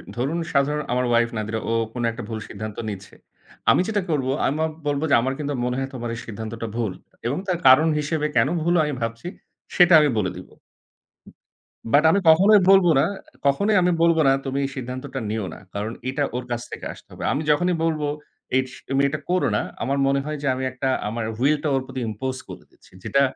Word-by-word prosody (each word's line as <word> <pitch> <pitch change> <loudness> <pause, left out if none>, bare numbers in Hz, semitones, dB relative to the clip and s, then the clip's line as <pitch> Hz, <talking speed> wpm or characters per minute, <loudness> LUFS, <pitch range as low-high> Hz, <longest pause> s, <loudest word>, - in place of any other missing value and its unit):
ধরুন 140 +8 -1
সাধারণ 145 +2 +1
আমার 125 0 +1
ওয়াইফ 120 0 +3
"নাদিরা" 110 +1 -2
ও - - +1 0.2
কোন 120 -1 -3
একটা 120 +1 -7
ভুল 110 -1 -4
সিদ্ধান্ত 110 0 -7
নিচ্ছে। 100 -1 -8 0.6
আমি - - +4
যেটা 210 -2 0
করব 135 -4 0 0.2
আমি 155 +4 0 0.2
বলব 145 0 0
যে - - +7
আমার 130 +2 -1
কিন্তু 145 -1 -2
মনে 125 0 -1
হয় 135 0 -3
তোমার 120 -1 -4
এই - - -7
সিদ্ধান্তটা 110 +1 -6
ভুল। 115 -5 -1 0.4
এবং 135 - -1
তার 180 -2 0
কারণ 135 +5 +7
হিসেবে 150 0 -1
কেন - - +4 0.2
ভুল 170 +1 +2
আমি 150 -1 -2
ভাবছি 115 +7 -4 0.5
সেটা 175 -1 +6
আমি 150 -1 +3
বলে 95 -4 0
দিব। 90 - -10 1.4
বাট 150 +2 +6
আমি 200 - +3
কখনোই 200 +6 +7
বলব 195 -2 +7
না, - - +4 0.4
কখনোই 200 +10 +3
আমি 180 0 +3
বলব 170 -1 +4
না - - +6
তুমি 135 +1 -2
এই - - -3
সিদ্ধান্তটা 130 +1 -5
নিও 110 -2 -2
না। - - -11
কারণ 105 +2 -3 0.2
এটা 145 +2 -1
ওর 125 - -2
কাছ 120 0 -1
থেকে - - -7
আসতে - - -18
হবে। - - -8
আমি 145 - -1
যখনই 175 +3 +2
বলবো 155 -3 0 0.5
এস 130 0 -1 0.2
তুমি 135 0 +2
এটা 155 +1 -3
করো 180 0 +2
না, - - +1 0.2
আমার 135 +3 0
মনে 140 0 +2
হয় 150 0 -3
যে 140 - -2
আমি 130 +1 -4
১ - - -19
টা 130 - +3 0.2
আমার 115 0 -3
Will 145 +4 +3
টা 150 - +1
ওর 135 - +1
প্রতি 130 -1 -6
impose 130 +5 -4
করে - - -9
দিচ্ছি। - - -23
যেটা 140 - +2
135 Hz, 210 wpm, -23 LUFS, 120-150 Hz, 1.4 s, যে